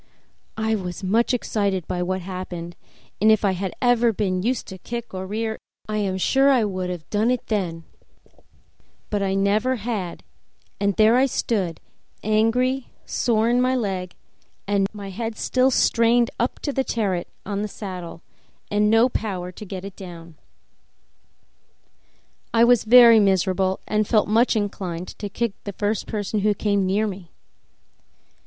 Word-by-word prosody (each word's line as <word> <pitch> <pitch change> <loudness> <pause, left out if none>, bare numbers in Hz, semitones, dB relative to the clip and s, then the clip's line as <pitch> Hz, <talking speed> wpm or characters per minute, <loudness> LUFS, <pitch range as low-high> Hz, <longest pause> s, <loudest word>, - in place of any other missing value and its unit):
I 220 0 0
was 185 -2 -4
much 220 +5 +2
excited 200 -7 -1
by 180 - -2
what 185 +1 -1
had 185 +2 -8
happened, 175 -2 -6 0.5
and 215 +1 +6
if 215 -1 +3
I 195 - +3
had 190 0 -4
ever 240 -1 +4
been 185 -3 -1
used 245 +6 -1
to 190 -1 -9
kick 235 +3 -6
or 190 0 -5
rear 220 +2 -3 0.3
I 215 0 -2
am 195 -3 -1
sure 270 +8 +3
I 260 -3 +4
should 185 -3 -2
have 175 -3 -6
done 215 +3 +2
it 250 0 0
then; 175 -6 -2 1.3
but 205 -1 0
I 195 -1 0
never 210 +6 +2
had, 210 -6 -4 0.6
and 200 -1 +1
there 220 +2 +5
I 265 +1 +4
stood, 195 -9 -1 0.4
angry, 240 +5 +1 0.2
sore 225 -2 +1
in 245 +1 +3
my 255 +1 +2
leg, 190 -6 -3 0.8
my 200 -2 -8
head 225 +2 -4
still 255 +1 +2
strained 235 -1 +3
up 240 - 0
to 285 - -2
the 265 - +1
terret 195 -8 -1 0.2
on 200 0 -2
the 210 - -2
saddle, 180 -5 -8 0.5
and 210 0 +3
no 225 +3 +5
power 190 -7 -3
to 210 - -10
get 190 -1 -7
it 200 -1 -8
down. 170 -3 -10 2.2
I 230 - +6
was 240 -2 +4
very 235 -1 +8
miserable 190 -1 +2
and 215 -1 +1
felt 215 -3 +3
much 230 +4 +3
inclined 185 -4 -3
to 205 - -4
kick 235 +1 -2
the 200 - -5
first 205 +2 -2
person 210 0 -2
who 210 +1 +2
came 200 -2 +1
near 205 +3 +1
me. 190 -4 -6
210 Hz, 160 wpm, -23 LUFS, 190-230 Hz, 2.2 s, very